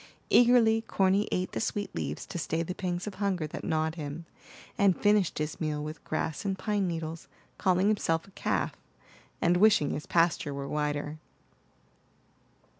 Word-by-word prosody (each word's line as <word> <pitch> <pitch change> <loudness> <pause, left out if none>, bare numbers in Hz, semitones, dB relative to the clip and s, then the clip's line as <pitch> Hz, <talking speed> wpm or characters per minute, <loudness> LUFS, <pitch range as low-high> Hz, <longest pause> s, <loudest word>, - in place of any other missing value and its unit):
Eagerly 235 -2 +6
Corny 195 -1 +2
ate 185 0 -1
the - - -3
sweet 205 -3 -2
leaves - - -4
to 175 - -5
stay 165 +1 -1
the 180 - -4
pangs 180 -1 -3
of 210 - -5
hunger 190 -5 0
that 150 - -7
gnawed 160 0 0
him, 155 0 -6 0.5
and 195 -3 +3
finished 205 -3 +3
his 155 +1 -3
meal 150 -1 -1
with 155 0 -7
grass 155 0 -2
and 195 -2 -1
pine 205 -2 0
needles, 165 -1 -4 0.3
calling 185 +1 +3
himself 165 -6 +1
a - - -17
calf, - - -1 0.7
and 175 +1 +4
wishing 205 -7 +4
his 150 - -4
pasture 165 -4 +2
were 140 0 -4
wider. 150 +1 -2
175 Hz, 160 wpm, -29 LUFS, 155-200 Hz, 0.7 s, Eagerly